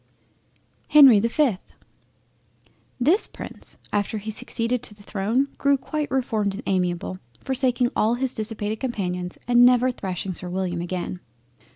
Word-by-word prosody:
HENRY 275 -8 +8
the 225 - +1
5th 235 -7 -1 1.2
This 320 - +3
Prince - - -9 0.2
after 205 +1 0
he 215 +1 -5
succeeded 230 +2 -2
to 210 - -7
the 205 - -17
throne 220 +8 0
grew 280 0 +3
quite 300 +2 -3
reformed 220 -6 0
and 225 - -7
amiable, 180 -1 -1 0.2
forsaking 255 -2 +1
all 225 +3 +2
his 260 +1 -2
dissipated 215 -1 -3
companions, 180 -8 -3
and 245 0 +6
never 250 +1 +5
thrashing 190 -4 -4
Sir 180 +1 -5
William 180 -1 -2
again. 180 0 -4
220 Hz, 140 wpm, -24 LUFS, 190-250 Hz, 1.2 s, HENRY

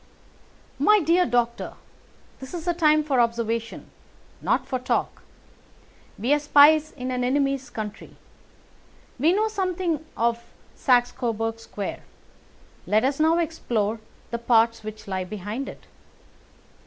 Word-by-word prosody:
"My 425 0 +5
dear 345 +2 +3
doctor, 235 0 -1 0.6
this 265 +6 -8
is 340 0 -6
a 350 - +2
time 310 -2 +3
for 280 -4 +1
observation, 230 -1 -1 0.5
not - - +1
for 255 - -2
talk. 250 - -2 1.0
We 245 +7 +1
are 295 - +3
spies 300 +1 +5
in 255 -1 -5
an 250 0 -1
enemy's 275 +1 0
country. 210 -2 -7 1.0
We 310 +6 +4
know 425 +4 +2
something 365 -6 -2
of 235 0 0 0.3
Saxe 245 -2 +3
Coburg 225 -1 -3
Square. 205 -3 -6 0.9
Let 215 +2 +3
us 275 +2 0
now 320 +2 +4
explore 235 -10 -1 0.3
the 235 - -2
parts 230 -1 +3
which 215 0 -8
lie 190 -1 -2
behind 210 +7 -5
it." - - -12
250 Hz, 130 wpm, -24 LUFS, 230-310 Hz, 1.0 s, My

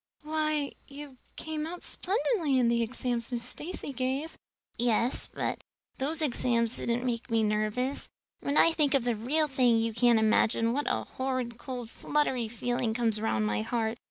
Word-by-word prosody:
"Why, 305 -2 0 0.2
you 280 -1 -10 0.2
came 310 -1 -4
out 350 +2 -7
splendidly 375 - 0
in 245 -2 +4
the 235 0 +2
exams 240 0 -2
Miss 240 -1 -1
Stacy 290 +3 -4
gave." 270 +5 -2 0.4
"Yes, 240 +1 +1
but - - -2 0.4
those 310 +4 0
exams 235 -4 +1
didn't 240 +2 -1
make 240 0 -2
me 225 -1 +2
nervous. 215 +6 -1 0.3
When 280 - -1
I 330 - +7
think 295 -3 +2
of 270 - +2
the 240 -1 +1
real 290 +8 +1
thing 255 -4 +3
you 225 0 0
can't 240 0 +4
imagine 225 +1 +3
what 290 +3 -1
a - - 0
horrid 255 -3 -3
cold 245 -4 -6
fluttery 265 -6 0
feeling 240 0 -1
comes 225 -3 +1
round 110 - +1
my 105 0 0
heart. 225 - -1
245 Hz, 165 wpm, -29 LUFS, 230-285 Hz, 0.4 s, I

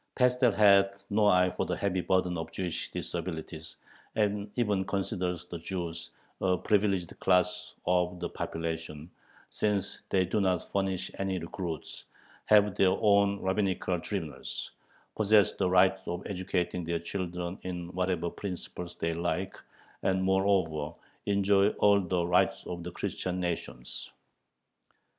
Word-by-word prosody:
Pestel 125 -1 +4
has 100 -2 +7 0.2
no 105 0 +4
eye 90 -2 +5
for - - -2
the - - -1
heavy 95 -2 0
burden 90 -1 +1
of 80 -1 -5
Jewish 90 -3 -3
disabilities, 80 -2 -5 0.4
and 105 -1 0
even 105 -6 +1
considers 90 -2 -2
the 85 -1 -7
Jews 85 -1 -5 0.3
a 90 -1 +2
privileged 100 -4 +1
class 105 +3 +1
of 90 0 +1
the 85 - -2
population, 80 -1 -5 0.4
since 105 -2 -1
they 95 -1 +3
do 100 +4 0
not 90 -3 0
furnish 95 -1 -1
any 95 -1 -1
recruits, 85 -2 -5 0.4
have 105 -2 +5
their 95 -1 +4
own 100 -2 +3
rabbinical 95 -2 0
tribunals, 85 -6 -5 0.4
possess 105 -2 +5
"the 95 - 0
right 95 +1 +5
of 90 +2 -4
educating 90 -2 -2
their 85 +1 -1
children 90 +1 -4
in 90 -2 -5
whatever 90 -2 0
principles 90 -2 -6
they 85 0 -1
like," 90 +3 -2 0.5
and 95 0 +1
"moreover 95 -5 +1 0.3
enjoy 100 0 +4
all 100 -1 +5
the 90 -1 0
rights 90 +1 +2
of 85 -1 -5
the 85 - -5
Christian 90 +1 -3
nations" 85 -8 -4
95 Hz, 135 wpm, -30 LUFS, 85-100 Hz, 0.5 s, has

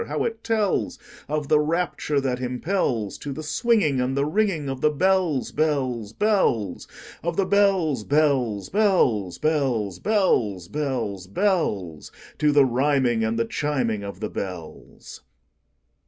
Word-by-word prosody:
how - - -2
it 225 -1 -3
tellsOf 195 -8 -2
the 150 - +4
rapture 155 -2 0
that 130 -2 -2
impelsTo 125 - -2
the 155 - -6
swinging 155 - +1
and 130 +2 -1
the 140 - +2
ringingOf 155 -7 -1
the 150 - +4
bells, 175 -3 +1
bells, 130 -8 -1
bells, 125 - 0 0.3
Of 170 0 -3
the 195 - +2
bells, 185 - +2
bells, 130 -8 +1
bells, 155 - +2
bells, 125 - 0
Bells, 115 - +1
bells, 120 -10 -3
bells—To 125 - -1
the 145 -1 +5
rhyming 130 -2 +1
and 110 +1 -1
the 115 - +1
chiming 120 -5 -1
of 100 0 -8
the 105 - -2
bells! 90 -5 -8
140 Hz, 125 wpm, -24 LUFS, 115-170 Hz, 0.3 s, the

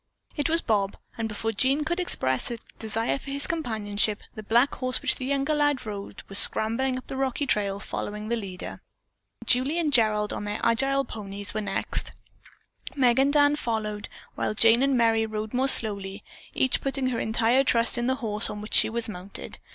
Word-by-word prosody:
It 295 +1 0
was 330 +1 +1
Bob, 200 -3 0 0.2
and 225 -1 -3
before 220 +1 -3
Jean 265 +7 +1
could 345 +3 -1
express 130 - 0
a 235 - -4 0.2
desire 225 +4 -1
for 275 - -10
his 280 +1 -2
companionship, 215 -9 -1
the 215 - -8
black 235 +6 +2
horse 255 -1 0
which - - 0
the 255 - -5
younger 275 +2 0
lad 290 -4 +1
rode 200 -2 -7
was 195 - +1
scrambling 255 +4 +3
up 255 - -8
the - - -7
rocky 270 +1 -1
trail 200 -5 0
following 210 +1 -5
the 235 - 0
leader. 195 -5 -7 0.6
Julie 260 +6 +1
and 310 -4 0
Gerald, 215 -3 +2
on - - -5
their 205 +1 -3
agile 270 +4 +1
ponies, 200 -1 -6
were 215 - -2
next; 205 - -2 0.8
Meg 250 -3 +3
and 275 +1 +3
Dan 290 0 +4
followed, 215 -6 -3 0.2
while 215 - -2
Jane 225 +2 +5
and 275 -1 +2
Merry 225 -1 +2
rode 215 +1 -5
more 260 +2 +1
slowly, 200 -5 +4 0.3
each 260 - +1
putting 270 -1 0
her 235 - -2
entire 230 +4 +2
trust 235 -3 +2
in 240 0 -1
the 260 - +1
horse 210 +1 +2
on 210 - -6
which 210 +1 -9
she - - +5
was 230 0 0
mounted. 195 -1 -8
230 Hz, 190 wpm, -26 LUFS, 210-270 Hz, 0.8 s, Jane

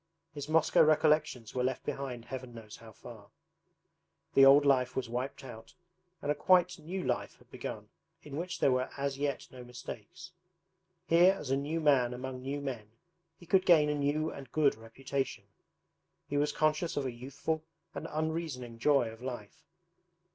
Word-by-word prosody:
His 145 0 -6
Moscow 160 0 +4
recollections 155 -6 +2
were 125 - 0
left 130 0 -1
behind 125 -4 -4
Heaven 130 -2 -7
knows 110 -2 -10
how 115 -1 -13
far! 110 -2 -13 1.0
The 135 - +7
old 140 +2 +8
life 130 -2 +3
was 130 - -2
wiped 125 +4 -4
out 115 -3 -11 0.5
and 145 - +1
a - - +3
quite 180 +1 +3
new 180 +5 -5
life 125 -2 -2
had - - -24
begun - - -6 0.4
in 145 -2 -8
which 175 +3 -4
there 135 - +4
were 130 0 0
as 140 0 -2
yet 145 -1 -2
no 125 -1 -10
mistakes. 120 -3 -9 0.7
Here 175 +2 +6
as 150 -9 -6
a - - +4
new 145 +4 -2
man 130 -6 +3
among 130 0 -6
new 140 +2 -4
men 120 -7 -5 0.5
he 175 - -15
could 185 +2 +3
gain 155 -5 +5
a - - +1
new 150 +2 0
and 135 -3 -10
good 150 -3 +3
reputation. 130 +4 -4 0.8
He 145 - -4
was 145 +1 +2
conscious 155 +2 0
of 140 - 0
a 130 - -2
youthful 140 +6 -4 0.3
and 165 - -5
unreasoning 155 -7 -3
joy 140 -1 +3
of 115 +1 -13
life. 120 -5 -8
140 Hz, 170 wpm, -31 LUFS, 125-155 Hz, 1.0 s, old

